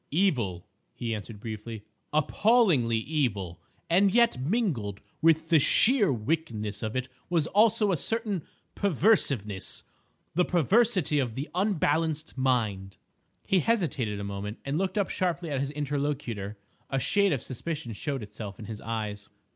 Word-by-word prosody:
"Evil," 125 - +1 0.3
he 115 -2 -3
answered 105 0 -7
briefly, 110 0 -7 0.3
"appallingly 155 - +3
evil, 110 - -2 0.3
and 190 +4 +4
yet 235 - +3
mingled 135 - -1 0.2
with 160 0 +3
the 165 -2 +6
sheer 220 - +4
wickedness 110 -5 -2
of 110 0 -3
it 130 0 -1 0.2
was 170 -4 +2
also 210 +2 +3
a 175 - +1
certain 215 - -1 0.3
perverseness—the 160 - 0
perversity 185 - +2
of 120 -5 -1
the 140 +4 -4
unbalanced 165 -5 0
mind." 110 -8 0 0.5
He 190 - +3
hesitated 150 - 0
a - - -4
moment 100 +2 -5
and 140 +4 -1
looked 190 +1 -1
up 200 - +1
sharply 175 -3 -1
at 140 - 0
his 140 0 -1
interlocutor. 140 -8 -3 0.3
A 135 - 0
shade 200 +9 +2
of 135 -6 0
suspicion 140 -1 -4
showed 135 +2 -3
itself 105 -1 -8
in 110 - -9
his 110 0 -7
eyes. 105 -3 -4
140 Hz, 140 wpm, -28 LUFS, 110-180 Hz, 0.5 s, the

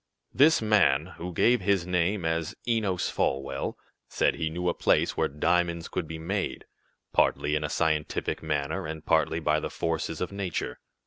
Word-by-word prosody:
"This 145 -2 +5
man, 90 -7 +3
who 90 +2 -5
gave 120 +7 +3
his 95 -2 +1
name 90 +1 0
as 80 0 -1
Enos 105 -6 +1
Folwell, 70 0 -1 0.3
said - - +2
he 80 -2 -2
knew 90 +3 -3
a 85 - +2
place - - +2
where - - +1
diamonds 85 +3 0
could 85 -4 -3
be 80 - -6
made, 95 +5 -3 0.5
partly 75 - +2
in 75 0 0
a 75 - -2
scientific 80 -2 -1
manner, 75 +2 -2
and 80 0 -7
partly 80 0 +2
by 75 -1 +1
the - - -4
forces 80 -1 -2
of 90 - -3
nature. 100 -3 -3
85 Hz, 170 wpm, -27 LUFS, 80-90 Hz, 0.5 s, This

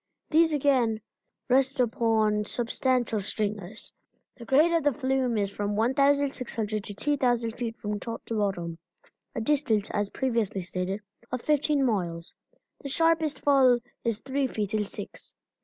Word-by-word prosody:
These 325 +1 +5
again 260 -7 +2 0.5
rest 265 +1 +2
upon 220 -3 +2
substantial 240 0 0
stringers. 205 0 -3 0.4
The 235 - -11
grade 300 +7 +4
of 335 -1 +3
the 290 -1 +2
flume 260 -3 0
is 200 -1 0
from 205 0 -2
1,600 250 -3 +1
to 205 - -5
2,000 245 -3 +1
feet 235 -1 -4
from 210 0 -3
top 230 +1 -6
to 225 - -3
bottom 175 -5 -2 0.6
a 230 - -2
distance, 225 -5 +1
as 205 -1 -1
previously 230 -7 -1
stated, 185 +3 -3 0.3
of 250 -1 -3
fifteen 295 -2 +2
miles. 175 -7 -2 0.5
The 280 - -5
sharpest 325 0 +2
fall 265 -4 +5 0.3
is 230 -2 -1
three 270 0 -1
feet 215 -3 -3
in 210 -1 +1
six. - - -7
235 Hz, 140 wpm, -27 LUFS, 210-275 Hz, 0.6 s, These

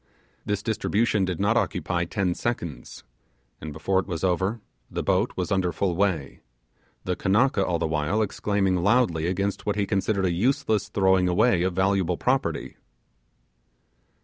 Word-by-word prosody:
This 105 -1 -1
distribution 110 -2 +1
did 90 -2 -3
not 105 +4 +2
occupy 85 -6 -1
ten 95 0 -1
seconds, 85 - -5 0.6
and 80 - -6
before 95 +6 0
it 95 - -4
was 85 -4 -4
over 95 +5 0 0.3
the - - -3
boat - - +1
was 90 +2 -3
under 95 -3 +1
full 90 -1 -1
way; 90 -7 -1 0.6
the 90 - -1
Kanaka 105 +3 +2
all 90 -2 0
the 85 - -1
while 80 +7 0
exclaiming 100 -2 0
loudly 85 -4 +2
against 100 +3 -2
what 105 - +1
he 100 -1 0
considered 95 0 0
a 90 - +1
useless 110 0 0
throwing 95 -2 +3
away 90 +1 +3
of 90 0 0
valuable 95 -2 +1
property. 130 +1 -1
95 Hz, 150 wpm, -25 LUFS, 90-105 Hz, 0.6 s, throwing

